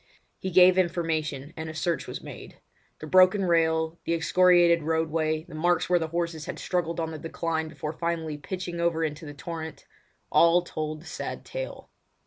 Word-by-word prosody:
He 190 - -3
gave 185 +1 +6
information, 160 -4 -1
and 160 0 -6
search 170 +2 -1
was - - -6
made. - - -10 0.4
The - - -5
broken 185 +4 +5
rail, 160 -1 +1
the 170 - 0
excoriated 175 0 +4
roadway, 160 0 0
the 175 - -14
marks 175 +2 +1
where 175 - +5
the 160 - -2
horses 170 -1 -3
had - - -5
struggled 170 -2 -2
on 160 -1 -2
the 155 - -7
decline 160 0 -2
before 155 0 -5
finally 165 -2 -3
pitching 175 +2 -5
over 170 -1 +1
into 155 0 -4
the 145 - -8
torrent—all 165 +2 -1
told 155 -2 -5
the - - -16
sad 160 - -6
tale. - - -7
165 Hz, 165 wpm, -27 LUFS, 160-175 Hz, 0.4 s, gave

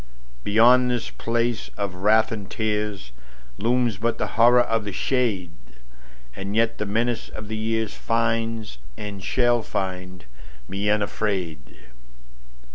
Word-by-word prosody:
Beyond 125 +4 +5
this 120 -2 -2
place 115 0 -1
of 100 -2 -2
wrath 105 +4 +3
and 105 -3 -5
tearsLooms 100 - -2
but 115 +2 0
the - - -2
Horror 120 +2 +6
of 115 -2 0
the 105 - -4
shade, 105 -7 0 0.8
And 100 +2 -4
yet 115 0 +2
the 105 - -2
menace 115 +3 -1
of 110 -1 -8
the 110 +1 -2
yearsFinds, 115 - -1 0.2
and 100 -2 -6
shall 120 -2 +2
find, 90 -4 -4 0.4
me 100 +2 -2
unafraid. 100 -6 -1
110 Hz, 120 wpm, -24 LUFS, 100-115 Hz, 0.8 s, Horror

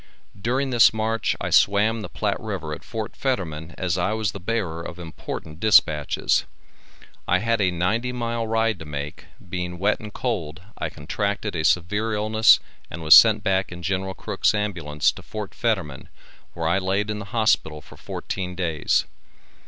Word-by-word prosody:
During 130 +5 0
this 120 -2 +6
march 110 +1 0
I - - -3
swam 105 +3 +3
the - - -7
Platte 105 -2 -2
river 95 -8 -4
at - - -8
Fort 110 -2 -5
Fetterman 85 - -3
as 90 -1 -1
I 90 +4 0
was 110 -2 -1
the 100 - -8
bearer 95 -5 -2
of 85 +1 -7
important 80 -2 -7
dispatches. 75 -8 +3 0.8
I 90 - +4
had 115 +2 0
a 95 - +3
ninety 90 +8 0
mile 115 -2 -2
ride 115 -3 +1
to 80 - -8
make, 75 0 -6 0.2
being 90 0 -4
wet 100 +4 +1
and 105 -1 -9
cold, 90 -9 -3
I - - -3
contracted 100 +5 -3
a 80 - -1
severe 105 +7 +1
illness 110 +1 +5 0.3
and 85 0 -7
was 80 0 +8
sent 110 +7 +8
back 95 -1 +1
in 90 0 -8
Gen. 95 +1 -1
Crook's - - 0
ambulance 85 -8 0
to - - -12
Fort 105 -2 -7
Fetterman 95 - -2 0.5
where 85 -1 -2
I 85 +4 +2
laid 100 +3 -1
in 105 - -4
the 105 - -7
hospital 105 -9 +1
for - - -16
fourteen 90 -2 -5
days. 85 -4 0
95 Hz, 170 wpm, -23 LUFS, 85-110 Hz, 0.8 s, was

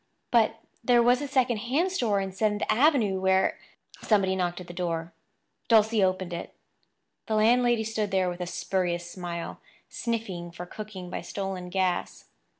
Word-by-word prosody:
But 225 -2 +4 0.3
there 240 0 +5
was 245 +2 +4
a 290 - -3
second 255 -3 +2
hand 275 - 0
store 225 - +1
in 195 -1 -3
Seventh 210 +2 0
Avenue 235 -7 +3
where— 190 0 +2 0.4
Somebody 195 -3 +2
knocked 175 -1 -1
at 180 - -8
the 175 - -9
door. 170 -2 -3 0.5
Dulcie 220 -2 +4
opened 185 -1 0
it. 170 - -6 0.7
The 220 - 0
landlady 240 +1 +4
stood 215 -1 -2
there 190 -1 +1
with 175 0 -4
a 180 - -3
spurious 175 -1 -1
smile, 175 -2 -5 0.3
sniffing 210 -7 -3
for 175 +1 -8
cooking 190 -2 -8
by - - -3
stolen 195 -2 -5
gas. 185 -1 -1
195 Hz, 155 wpm, -27 LUFS, 180-225 Hz, 0.7 s, there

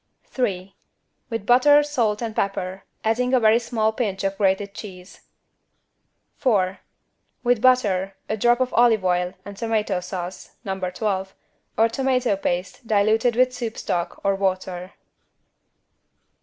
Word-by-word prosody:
3. 195 -7 -3 0.6
With 225 -3 -4
butter 290 +5 +6
salt 235 -7 0
and 225 -2 -4
pepper, 195 -1 -2 0.2
adding 250 +4 +1
a - - +4
very 220 0 +5
small 220 -2 0
pinch 205 -5 -2
of 195 0 -1
grated 195 0 0
cheese. 185 -3 -11 1.2
4. 195 -7 +1 0.6
With 245 -2 +2
butter, 200 -7 +2
a 215 - -1
drop 240 +3 +3
of 255 - 0
olive 225 -4 +4
oil 180 0 0
and 200 - -8
tomato 215 -3 -1
sauce 180 0 -7
(No. 190 -1 -3
12) 190 +1 -2 0.4
or 225 - +5
tomato 255 -2 +1
paste 185 +4 -3
diluted 220 +3 +2
with 255 +1 +3
soup 235 -3 -5
stock 170 -1 -3
or 195 - +3
water. 185 -1 -2
210 Hz, 130 wpm, -23 LUFS, 190-240 Hz, 1.2 s, butter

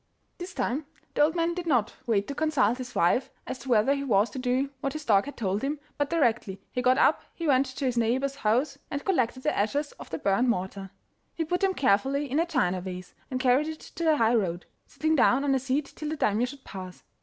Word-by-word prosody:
This 355 0 -7
time 280 +4 -1 0.3
the - - +1
old 310 +3 +4
man 335 0 +1
did 350 -1 -5
not 245 -8 +2
wait 205 -3 +1
to - - -3
consult 275 -6 +1
his 250 -1 -7
wife 175 +10 +2 0.2
as 260 - -5
to 250 +2 -9
whether 235 +3 +4
he 280 0 -2
was 215 -4 +2
to 260 - -5
do 255 +2 0
what 275 0 -2
his 310 -1 -6
dog 200 -3 +4
had 285 - -8
told 200 -2 -1
him, 285 +2 -2 0.2
but 290 0 +1
directly 235 - +1
he 250 - -1
got 255 +1 +4
up 295 - +4
he 335 - -5
went 275 -2 +3
to 260 +1 -4
his 245 -2 +1
neighbour's 260 +4 0
house 270 +5 +1
and 285 +1 -4
collected 255 -8 0
the 305 - +1
ashes 285 +8 0
of - - -10
the 160 - -3
burnt 200 +7 +2
mortar. 195 -2 -2 0.5
He 325 - -1
put 355 +3 -1
them 385 -1 +2
carefully 270 +4 +1
in 290 - +2
a 335 - +1
china 190 - +1
vase, 180 -1 -7 0.2
and 255 -2 -2
carried 260 +3 +3
it 315 0 -5
to 335 - -7
the 315 -2 +4
high 230 -1 +3
road, 180 -6 0 0.2
Sitting 315 0 0
down 270 -1 +4
on 280 -1 +2
a 265 - +2
seat 270 +3 -2
till 305 -2 -4
the 315 - -3
Daimio 220 0 +1
should 270 +1 -10
pass. 185 -2 -9
260 Hz, 240 wpm, -27 LUFS, 220-290 Hz, 0.5 s, old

